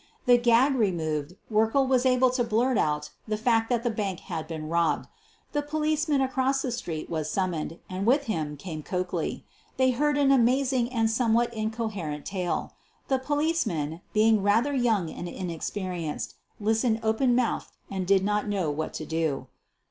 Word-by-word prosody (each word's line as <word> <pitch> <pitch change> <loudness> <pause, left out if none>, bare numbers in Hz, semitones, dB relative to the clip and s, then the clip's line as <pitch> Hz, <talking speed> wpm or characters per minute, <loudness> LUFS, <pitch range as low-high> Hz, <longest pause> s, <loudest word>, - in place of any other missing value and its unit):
The 245 -1 +6
gag 240 +3 +4
removed, 165 - -1 0.2
Werkle 225 +5 +3
was 260 0 +3
able 255 0 +4
to 250 -1 +1
blurt 235 +3 +1
out 150 -5 0 0.2
the 215 0 -1
fact 225 0 +2
that 240 -2 +1
the 240 - +1
bank 200 -5 -3
had 160 -1 -5
been 155 -2 -5
robbed. 165 -2 +1 0.4
The 295 - 0
police 310 +1 -1
man 285 -2 +3
across 265 +1 +1
the 255 - -2
street 165 -9 -4
was 155 -2 -2
summoned, 170 -2 -2
and 190 +3 -3
with 275 +4 +4
him 155 - -3
came 155 0 -6
Coakley. 180 +3 -3 0.3
They 260 0 +4
heard 290 +3 +1
an 280 -1 +4
amazing 255 -1 +3
and 225 -3 +2
some 225 0 +2
what 235 0 +2
incoherent 215 -9 -3
tale. 180 -3 -2 0.4
The 265 -1 +2
policeman, 260 - -1
being 220 0 +4
rather 225 +8 +2
young 225 - +1
and 175 - -6
inexperienced, 175 -2 -4 0.3
listened 220 +2 +1
open 230 +3 +2
mouthed 245 -2 -1
and 190 -2 -3
did 195 -1 +4
not 210 +1 0
know 190 -7 0
what 155 +2 -4
to 155 - -4
do. 160 -3 -2
220 Hz, 170 wpm, -27 LUFS, 175-255 Hz, 0.4 s, The